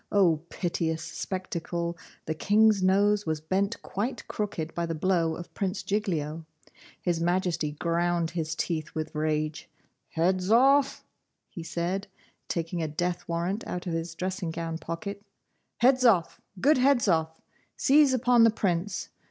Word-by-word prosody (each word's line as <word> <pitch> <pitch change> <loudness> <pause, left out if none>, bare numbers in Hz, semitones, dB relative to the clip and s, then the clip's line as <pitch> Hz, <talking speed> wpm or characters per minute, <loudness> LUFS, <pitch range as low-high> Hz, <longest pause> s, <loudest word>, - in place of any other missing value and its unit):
O 185 -6 +4
piteous 160 -2 -2
spectacle! 170 0 -4 0.3
the 160 - -1
King's 210 +4 +4
nose 200 +1 +3
was 155 -1 0
bent 195 +7 -1
quite 220 +7 -3
crooked 175 -7 -3
by 170 0 -2
the 165 - -2
blow 165 -1 +1
of 175 - -9
Prince 195 0 -2
Giglio! 165 -7 -2 0.6
His 175 -2 -1
Majesty 170 -3 0
ground 170 +1 0
his 160 -2 -3
teeth 160 -2 -3
with 155 0 -3
rage. 155 0 -2 0.5
'Hedzoff,' 225 +12 +3 0.5
he 170 - -7
said, 175 +4 -2 0.4
taking 170 +1 -2
a 160 - -1
death 175 +4 -2
warrant 175 +6 -2
out 180 - -4
of 175 - -3
his 165 0 -3
dressing 185 0 -3
gown 165 0 -4
pocket, 180 +5 -5 0.6
'Hedzoff, 245 -9 +4 0.2
good 285 +6 +4
Hedzoff, 190 - +2 0.4
seize 290 0 +5
upon 245 -2 +4
the 230 - +7
Prince. 185 -3 -1
175 Hz, 135 wpm, -28 LUFS, 165-200 Hz, 0.6 s, the